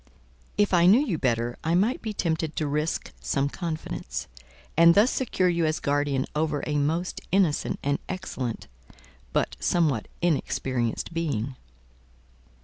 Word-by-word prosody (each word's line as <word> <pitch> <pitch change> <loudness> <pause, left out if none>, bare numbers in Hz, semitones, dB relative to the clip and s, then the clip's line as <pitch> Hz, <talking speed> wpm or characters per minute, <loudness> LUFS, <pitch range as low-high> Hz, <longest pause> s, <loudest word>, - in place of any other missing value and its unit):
"If 205 -2 +2
I 175 -1 +6
knew 210 +7 +7
you 180 - -1
better, 120 -1 0
I 165 +2 +1
might 210 +8 +2
be 220 - -3
tempted 160 -5 -1
to 155 - -1
risk 150 +2 -2
some 140 0 0
confidence, 165 -1 -4 0.5
and 170 +1 +7
thus 215 +5 +5
secure 220 -8 +1
you 170 -1 +1
as 155 - 0
guardian 145 -2 0
over 150 -1 0
a 150 -1 0
most 165 +5 -1
innocent 185 -6 +2
and 140 0 +1
excellent, 155 -11 -4 0.7
but - - 0
somewhat 150 -10 +1
inexperienced 130 -6 -1
being." 140 -7 -2
160 Hz, 140 wpm, -26 LUFS, 140-175 Hz, 0.7 s, knew